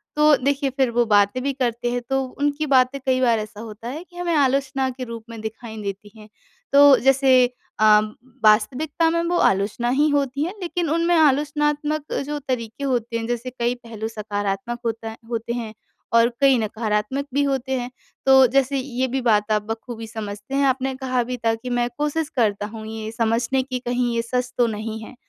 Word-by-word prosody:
तो 300 0 +6
देखिए, 275 +2 0
फिर 265 -1 +1
वो 240 0 +2
बातें 205 +2 +3
भी 280 0 0
करते 240 -2 -1
हैं, 245 0 -1
तो 270 0 +1 0.2
उनकी 290 +1 0
बातें 255 +2 +3
कई 260 -1 +2
बार 235 -3 +3
ऐसा 215 0 -7
होता 225 +1 -9
है 305 +6 -6
कि 360 -1 -23
हमें 350 -1 -1
आलोचना 270 -2 +1
के 255 0 -6
रूप 230 -2 -7
में 230 -1 -8
दिखाई 220 +1 -7
देती 200 +1 -6
हैं। 215 0 -14 0.4
तो 285 -1 +8
जैसे 270 +1 +3 0.5
अ, - - +2 0.6
वास्तविकता 260 +10 +3
में 335 +1 +1
वो 350 - +1
आलोचना 205 +5 +1
ही 290 +4 +3
होती 280 -1 0
है, 350 +4 -3
लेकिन 345 -2 -2
उनमें 335 +2 +2
आलोचनात्मक 295 0 +1
जो 295 +1 -3
तरीके 255 -2 -4
होते 240 -4 -1
हैं, 225 - -4
जैसे 240 +1 -3
कई 240 -1 -1
पहलू 230 -3 -7
सकारात्मक 205 +1 -3
होता 225 0 -3
होते 230 0 -3
हैं 230 -3 -5 0.4
और 230 0 +5
कई 270 -2 +5
नकारात्मक 220 +4 -1
भी 285 +1 +2
होते 270 -1 -1
हैं। 245 0 -5 0.4
तो 265 -1 +7
जैसे 275 +2 +1
ये 260 -1 -2
भी 260 +1 -2
बात 215 -3 +2
आप 210 -1 +2
बखूबी 225 0 -6
समझते 210 +2 -6
हैं। 280 0 +3
आपने 265 0 0
कहा 255 -2 -1
भी 250 +1 -4
था 225 - +4
कि, 230 +3 -8
"मैं 245 0 +1
कोशिश 300 +1 -1
करता 205 -4 +1
हूँ 220 0 -9
ये 220 0 -6
समझने 235 +3 0
की, 255 -1 -4
कहीं 245 0 -1
ये 230 - +1
सच 250 +1 -3
तो 240 - +4
नहीं 220 0 -4
है, 255 - -11
250 Hz, 195 wpm, -22 LUFS, 225-275 Hz, 0.6 s, तो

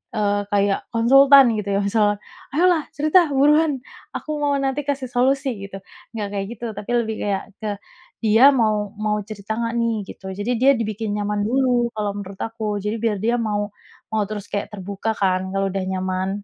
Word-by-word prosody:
eee, 205 -1 +1
kayak 200 -1 +2
konsultan, 275 +4 +7
gitu, 205 -1 -3
ya, - - +2
misal, 210 +1 +2 0.5
"Ayolah 340 +1 +3
cerita, 310 +5 +4 0.2
buruan! 300 +3 +4 0.4
Aku - - -6
mau 285 -1 +2
nanti 270 +1 -1
kasih 270 -3 -2
solusi," 265 +2 +2 0.2
gitu. 195 -1 -8 0.4
Nggak 210 -2 -2
kayak 195 -1 -2
gitu, 235 - -7
tapi 210 - -6
lebih 220 -1 -2
kayak 195 -2 -1 0.2
ke 215 - -3 0.5
dia 220 +2 +4 0.2
mau 210 -2 +1
mau 210 0 +1
cerita 210 0 -7
nggak, 230 0 -2
nih, 230 0 +1 0.2
gitu. - - -11
Jadi 215 +4 -1
dia 270 +2 +7
dibikin 215 -1 -3
nyaman 205 0 -1
dulu 245 -1 +2
kalau 210 -1 -1
menurut 195 -1 -8
aku, 225 0 -9 0.2
jadi 210 +1 -1
biar 220 -3 +1
dia 235 +2 +2
mau 205 -1 -2 0.4
mau 215 -1 +1
terus 210 -2 -5
kayak 200 0 -2
terbuka, 200 +2 -3
kan, 185 -2 +2
kalau 195 0 0
udah 195 0 -2
nyaman. 185 0 -2
215 Hz, 180 wpm, -22 LUFS, 205-250 Hz, 0.5 s, konsultan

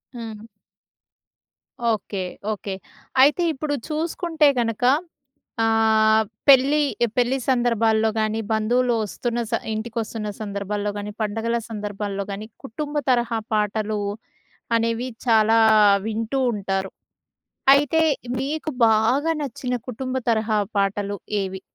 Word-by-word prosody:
హ్మ్. 225 -2 -8 1.5
Okay. 200 -2 -4 0.3
Okay. 200 -1 -6 0.5
అయితే 290 +6 +5
ఇప్పుడు 295 +1 -3 0.2
చూసుకుంటే 320 0 +1
గనక 230 -1 -1 0.8
ఆహ్, 220 -1 +4 0.2
పెళ్లి 275 +2 +6 0.4
పెళ్లి 250 +2 +2
సందర్భాల్లో 230 -3 +2
గాని, 215 0 0
బంధువులు 240 +3 +2
వస్తున్న 240 +3 -3
స - - -1 0.2
ఇంటిికొస్తున్న 220 -1 -4
సందర్భాల్లో 205 0 -3
గాని, 205 0 -5
పండగల 225 +2 -1
సందర్భాల్లో 205 -2 -4
గాని 200 +2 -5 0.2
కుటుంబ 290 +4 -5
తరహా 240 -2 +2 0.2
పాటలు 210 0 0 0.8
అనేవి 230 +2 -1 0.2
చాలా 225 -1 +4 0.5
వింటూ 225 +4 -2
ఉంటారు. 195 -2 -2 0.8
అయితే 290 +3 +2 0.4
మీకు 305 +3 -3 0.2
బాగా 240 +9 +2
నచ్చిన 250 -2 -3
కుటుంబ 255 +2 -4
తరహా 220 -1 +1 0.2
పాటలు 200 0 0 0.3
ఏవి? 190 0 -5
225 Hz, 100 wpm, -23 LUFS, 210-250 Hz, 1.5 s, పెళ్లి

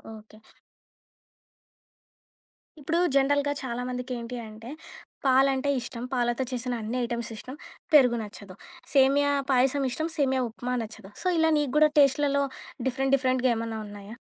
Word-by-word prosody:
Okay. 215 0 -16 2.4
ఇప్పుడు 325 +4 0 0.2
జనరల్‌గా 285 +1 +2
చాలామందికి 250 +1 -4
ఏంటి 235 +1 -6
అంటే, 225 +3 -11 0.6
పాలంటే 270 +1 +3
ఇష్టం, 240 -1 -7
పాలతో 240 0 0
చేసిన 250 0 -3
అన్ని 225 +4 -3
ఐటెమ్స్ 235 -1 -4
ఇష్టం, 255 +6 -9 0.4
పెరుగు 250 -5 +6
నచ్చదు. 200 -2 -10 0.4
సేమియా 280 +1 +4 0.2
పాయసం 265 +2 +3
ఇష్టం, 315 +6 -2
సేమియా 265 -2 +2
ఉప్మా 245 +2 -5
నచ్చదు. 215 -2 -11
సో, - - -2
ఇలా 320 0 +4
నీకు 285 -3 -2
కుడా 305 0 +6
టేస్ట్‌లలో 280 0 +3 0.4
డిఫరెంట్, 270 +1 0
డిఫరెంట్‌గా 255 -1 +1
ఏమన్నా 225 -1 -4
ఉన్నాయా? 205 +2 -10
255 Hz, 125 wpm, -27 LUFS, 235-275 Hz, 2.4 s, పెరుగు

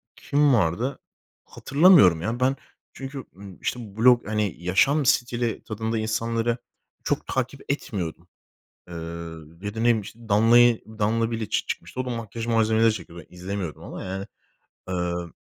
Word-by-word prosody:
kim 145 -1 +2
vardı 110 +6 +1 0.5
hatırlamıyorum 140 - +5
ya, 115 +6 -2
ben. 130 +2 +2 0.4
Çünkü, 135 0 -7 0.4
işte, 110 -4 -4
blog, 120 -1 +5
hani, 105 -5 -1
yaşam 135 - +3
stili 120 -1 +1
tadında 110 +1 -3
insanları 115 +2 -1 0.5
çok - - -1
takip 130 +1 -2
etmiyordum, 90 - -4 0.6
eee, 90 - -10
ya 85 +3 -7
da, 110 - -5
ne - - -1
bileyim, 115 -2 +3
işte, 105 +3 -12
Danla'yı, 115 +3 +5 0.2
Danla 115 +2 +1
Biliç 115 -2 -2
çıkmıştı. - - -5
O - - -7
da 125 - -4
makyaj 115 -1 -5
malzemeleri 110 -1 +3
çekiyordu. 85 -3 -9
Ben - - -17
izlemiyordum 90 -2 -5
ama, - - -7
yani. 95 +1 -4 0.6
Eee 90 -1 -2
110 Hz, 140 wpm, -25 LUFS, 95-120 Hz, 0.6 s, hatırlamıyorum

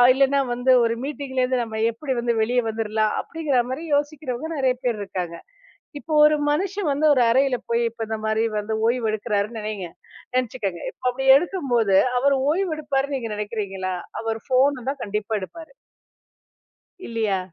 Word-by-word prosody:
இல்லைன்னா 275 +1 +3
வந்து 250 +1 +3
ஒரு 230 0 +1
மீட்டிங்லேந்து 260 -3 -1
நம்ம 220 -1 -6
எப்படி 265 +4 -4
வந்து, 235 0 0
வெளிய 245 +2 +2
வந்துடுலாம் 220 -1 0
அப்படிங்கிற 295 -7 0
மாரி 310 +6 -4
யோசிக்கிறவங்க, 290 -1 -3
நெறைய 260 -2 +2
பேர் 235 -4 0
இருக்காங்க. 180 -3 -5 0.6
இப்போ 315 - -6
ஒரு 305 0 +5 0.2
மனுஷன் 380 +2 -1
வந்து, 300 +3 0
ஒரு 250 - +3
அறையில 265 0 +3
போயி, 235 0 +2
இப்ப 230 -1 -5
இந்த 220 - -1
மாரி 220 +1 +1 0.2
வந்து 215 +1 -3
ஓய்வு 235 -1 +1
எடுக்கிறான்னு 215 +1 -1
நெனைங்க 210 -4 -4 0.5
நெனச்சுக்கங்க. 220 -8 -2 0.3
அப்படி 260 +2 -1
எடுக்கும்போது, 250 - +1 0.2
அவரு 280 +1 +3 0.2
ஓய்வு 360 +1 0
எடுப்பாருன்னு 280 -1 -1
நீங்க 230 -3 -5
நெனைக்கறீங்களா? 200 -3 -3 0.3
அவர் 225 0 -2
ஃபோன 260 0 +2
தான் 280 -2 -4
கண்டிப்பா 210 +1 -2
எடுப்பாரு. 325 - -9 1.4
இல்லையா? 220 -4 0
245 Hz, 145 wpm, -23 LUFS, 220-280 Hz, 1.4 s, ஒரு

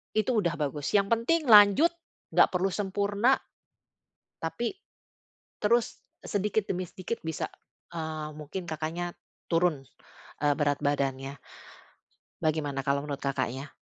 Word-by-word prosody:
itu 215 +2 +2
udah 175 -5 +1
bagus, 145 +1 -3
yang 200 0 +3
penting 260 +5 +2
lanjut, 210 - +8 0.4
nggak - - +6
perlu 190 +2 +2
sempurna 205 +5 +2 1.1
tapi 165 - -2 0.9
terus 235 +2 +2 0.2
sedikit 210 +1 0
demi 185 -1 -1
sedikit 185 +7 -5
bisa, 160 - -3 0.4
eee, 155 -2 -4
mungkin 155 +5 -5
Kakaknya 165 +3 -3 0.4
turun, 165 -4 +2 0.6
eee, 145 -1 +4
berat 145 -1 +1
badannya. 140 -1 -1 1.1
Bagaimana 150 -3 0
kalau 140 +1 0
menurut 140 -2 -4
Kakaknya? 140 0 -3
165 Hz, 110 wpm, -28 LUFS, 145-205 Hz, 1.1 s, lanjut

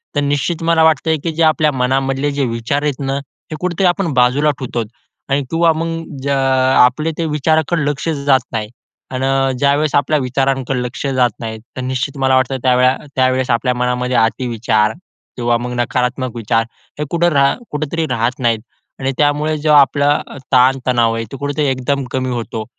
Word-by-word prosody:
तर - - +2
निश्चित 145 +4 -1
मला 165 -1 +3
वाटतंय 160 0 +2
की 165 - -1
जे 165 - +2
आपल्या 155 -1 +3
मनामधले 135 +2 0
जे 140 -1 -1
विचार 115 +5 -2
आहेत 145 -3 -1
ना, 135 -1 -2
हे 140 +3 -10
कुठेतरी 180 +1 0
आपण 175 -3 0
बाजूला 130 +4 +3
ठेवतो. 120 -3 -3 0.5
आणि 140 +1 +1
किंवा 165 0 +3
मग 165 +1 -2
अ, 155 -3 -10
ज्या 140 0 0 0.4
अ, - - +8
आपले 155 +6 0
ते 165 - -1
विचाराकडे 155 +1 +1
लक्ष 145 +2 -4 0.2
जात 135 -2 +5
नाही. 110 -2 -3 0.5
अन् 135 0 0
ज्यावेळेस 140 +2 +1
आपल्या 145 +2 +2
विचारांकडे 135 0 -1
लक्ष 125 +3 -5
जात 125 -1 +3
नाही, 110 -1 -5 0.2
तर - - -3
निश्चित 130 +2 -3
मला 130 -1 +2
वाटतं 130 +1 +1
त्यावेळा 125 0 +4 0.2
त्यावेळेस 130 0 +1
आपल्या 125 +2 +1
मनामध्ये 125 0 -1
अति 115 +3 +1
विचार 110 -2 +1 0.4
किंवा 120 -1 +1
मग 125 +1 -5
नकारात्मक 125 0 -1
विचार, 115 0 0 0.4
हे 150 - -1
कुठं 170 0 +2
रा 140 -1 +4 0.2
कुठेतरी 155 +2 -2
राहत 120 +3 -1
नाहीत. 115 -3 +1 0.4
आणि 135 0 -1
त्यामुळे 150 +1 +1
जो 150 +1 0
आपला 145 0 +4 0.2
अ, - - -10
ताण-तणाव 125 -3 +3
आहे 115 0 -3
तो 135 - -6
कुठेतरी 145 +2 -2
एकदम 135 +1 -1
कमी 130 0 -1
होतो. 115 -2 -4
135 Hz, 180 wpm, -17 LUFS, 125-150 Hz, 0.5 s, अ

